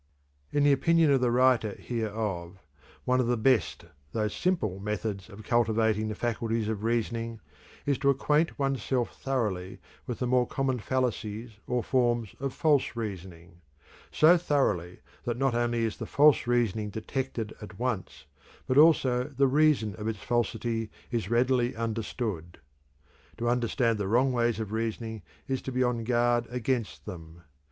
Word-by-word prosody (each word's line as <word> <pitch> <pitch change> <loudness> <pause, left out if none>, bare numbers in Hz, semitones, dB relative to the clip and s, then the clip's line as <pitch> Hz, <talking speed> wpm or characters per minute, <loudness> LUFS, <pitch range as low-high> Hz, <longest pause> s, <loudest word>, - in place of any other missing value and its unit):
In 145 - +2
the 145 - +5
opinion 160 +3 +4
of 135 -2 +3
the 125 - +3
writer 125 -3 +3
hereof, 105 -6 -3 0.5
one 130 0 +2
of 125 - +1
the 120 0 +1
best 110 - +1 0.3
though 105 -1 0
simple 105 - -1
methods 105 -1 -4
of 105 +2 -11
cultivating 110 -1 +2
the 110 - -3
faculties 115 -1 -1
of 110 -1 -3
reasoning 115 0 -1 0.5
is 140 -2 +1
to 140 0 +2
acquaint 150 +4 +2
one's 135 -4 0
self 125 -1 -2
thoroughly 105 -9 -2 0.3
with 120 - -3
the 125 - -2
more 125 0 +2
common 135 -2 -1
fallacies 115 -2 -2 0.2
or 125 -1 0
forms 120 -4 +1
of 140 0 -2
false 145 -3 +2
reasoning 90 -6 -7 0.5
so 165 +3 +6
thoroughly 105 - 0 0.2
that 120 -1 -1
not 135 -1 +1
only 120 -1 +1
is 110 - -3
the - - -6
false 145 -3 +4
reasoning 115 -3 +1
detected 115 +1 -4
at 105 -3 -10
once 95 - -3 0.4
but 130 +2 +3
also 130 -6 +5
the 140 -1 +1
reason 135 -6 +3
of 105 - -4
its 110 -2 -2
falsity 115 0 -1 0.2
is 115 -5 -2
readily 125 +1 +2
understood. 110 -6 -3 0.8
To 120 +1 -2
understand 120 -1 +1
the 100 - -1
wrong 125 +6 +3
ways 120 -2 +1
of 110 -2 -4
reasoning 110 0 -3 0.3
is 130 -1 -1
to 130 - -5
be 130 0 +1
on 120 -2 -1
guard 120 0 +2
against 125 -1 -2
them. 85 -3 -10
120 Hz, 155 wpm, -28 LUFS, 110-130 Hz, 0.8 s, so